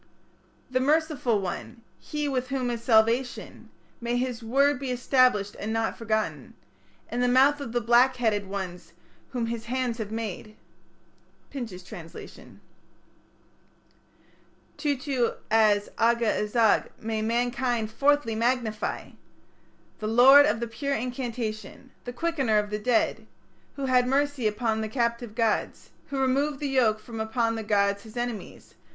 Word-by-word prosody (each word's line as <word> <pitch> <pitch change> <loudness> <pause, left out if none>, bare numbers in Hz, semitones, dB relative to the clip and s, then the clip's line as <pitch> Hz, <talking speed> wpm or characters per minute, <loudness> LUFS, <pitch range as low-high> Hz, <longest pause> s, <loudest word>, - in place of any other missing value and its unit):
"The 255 - +2
merciful 290 -5 +1
one", 195 +5 -6 0.2
"he 300 -1 -3
with 260 -2 -1
whom 255 -2 -2
is 235 -1 -4
salvation", 235 +2 +1 0.3
May 240 +1 -1
his 250 -1 -2
word 275 +4 +2
be 270 -2 -4
established, 250 -4 +2
and 215 - -3
not 225 0 -1
forgotten, 220 -1 -3 0.6
In 240 - -2
the 250 - +3
mouth 270 +4 +4
of 240 - -5
the 240 +1 0
black 240 +3 +4
headed 215 -5 0
ones 180 -3 -6 0.4
whom 245 -3 -2
his 230 0 -4
hands 245 -1 -2
have 215 -2 -4
made. 215 -1 -5 1.0
Pinches' 220 -10 -6
Translation 165 -2 -11 2.1
Tutu 275 -4 -1 0.2
as 210 -2 +4
Aga 235 +1 +3
azag 215 +1 +2
may 220 -1 -3
mankind 240 0 0
fourthly 280 -1 +2
magnify! 230 -1 -1 0.9
"The 215 - -3
Lord 265 +6 +7
of 235 - 0
the 235 - -3
Pure 275 +5 -2
Incantation", 240 -1 -5
"the 245 - -4
Quickener 270 -6 0
of 210 0 0
the 210 - -2
Dead 240 +1 0 0.2
", - - -35
"Who 275 - -3
had 250 -1 +3
mercy 280 -2 +1
upon 220 +1 -1
the 220 - -3
captive 235 -2 -2
gods", 225 -2 -1 0.2
"Who 275 - -4
removed 270 +2 +1
the 290 - -2
yoke 235 -5 +2
from 225 0 -9
upon 225 +1 0
the 225 - -3
gods 200 -1 +1
his 220 +3 -12
enemies". 240 -3 -5
235 Hz, 140 wpm, -26 LUFS, 220-260 Hz, 2.1 s, Lord